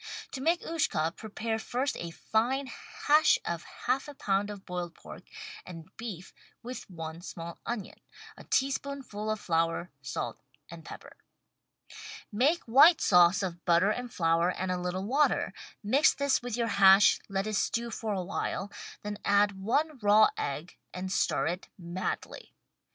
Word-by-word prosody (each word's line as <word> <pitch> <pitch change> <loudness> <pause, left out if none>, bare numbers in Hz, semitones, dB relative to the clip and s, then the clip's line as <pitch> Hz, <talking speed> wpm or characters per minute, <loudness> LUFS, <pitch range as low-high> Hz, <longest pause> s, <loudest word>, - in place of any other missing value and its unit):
To 260 - -5
make 335 +5 +2
"Ushka" 170 - 0
prepare 220 +1 -4
first 255 +5 -2
a 170 - -4
fine 235 +10 0 0.4
hash 300 +1 +6
of 170 -1 -2 0.2
half 270 +3 +1
a 290 - -9
pound 200 -3 0
of 205 -2 -8
boiled 175 -1 -5
pork - - -11 0.4
and 170 0 -11
beef 205 -6 -7 0.3
with 250 -2 -7
one 165 -2 -7
small 170 -2 -8
onion, 230 -4 -5 0.4
a - - -12
tablespoonful 270 -5 -2
of 215 -1 -1
flour, 165 0 0
salt 140 +1 -4 0.3
and 170 -1 -10
pepper. - - -11 1.1
Make 275 +11 +2
white 280 +9 +7
sauce 180 +1 +5
of 175 -2 -4
butter 175 +4 +4
and 245 +2 -4
flour 165 -1 +2
and 185 0 -2
a 180 -1 -2
little 180 +2 -3
water, 280 +7 +2 0.3
mix 270 +9 +4
this 280 -1 +1
with 245 -2 -4
your 235 - +1
hash, 200 -2 +6
let 195 0 -1
it 215 - -3
stew 235 +3 0
for 220 -2 -3
a 185 - -2
while, 195 +1 -3 0.3
then 205 0 -5
add 200 -1 +2
one 290 +7 0
raw 210 0 +6
egg 150 +5 -4 0.2
and 185 +1 -4
stir - - +1
it 180 +2 -3
madly. 175 +1 -5
205 Hz, 155 wpm, -29 LUFS, 180-245 Hz, 1.1 s, white